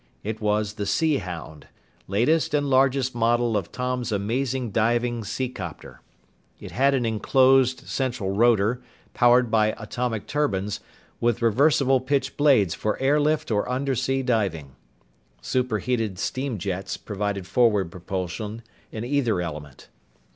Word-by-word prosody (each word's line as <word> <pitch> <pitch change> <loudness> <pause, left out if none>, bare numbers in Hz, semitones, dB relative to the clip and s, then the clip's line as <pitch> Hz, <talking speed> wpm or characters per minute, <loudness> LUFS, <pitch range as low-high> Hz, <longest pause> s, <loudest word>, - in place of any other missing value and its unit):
It 110 +2 -4
was 105 0 0
the 105 -2 -4
Sea 155 +7 +2
Hound, 85 - -8 0.4
latest 145 - +1
and 145 -1 +1
largest 130 -1 +2
model 120 0 +1
of 100 -4 -2
Tom's 125 -2 -3
amazing 120 +4 -1
diving 120 +2 +1
seacopter. 100 -5 -6 0.6
It - - -9
had 140 +1 +2
an 125 -3 0
enclosed 130 +3 +3
central 130 -7 -2
rotor, 115 +2 +2 0.3
powered 120 -1 +4
by 110 -1 +2
atomic 115 0 -3
turbines, 105 -9 -1 0.4
with 120 0 0
reversible 135 +3 +3
pitch 135 +2 -1
blades 130 - +4
for 105 -1 -2
air 140 +3 +2
lift 150 -3 0
or 105 -1 0
undersea 135 0 -1
diving. 95 - -1 0.6
Superheated 115 - -1
steam 130 +3 -3
jets 95 0 -4
provided 100 -2 -4
forward 105 -3 +2
propulsion 95 +5 -5 0.3
in 110 - -5
either 125 -7 +1
element. 75 -5 -7
115 Hz, 125 wpm, -24 LUFS, 100-130 Hz, 0.6 s, powered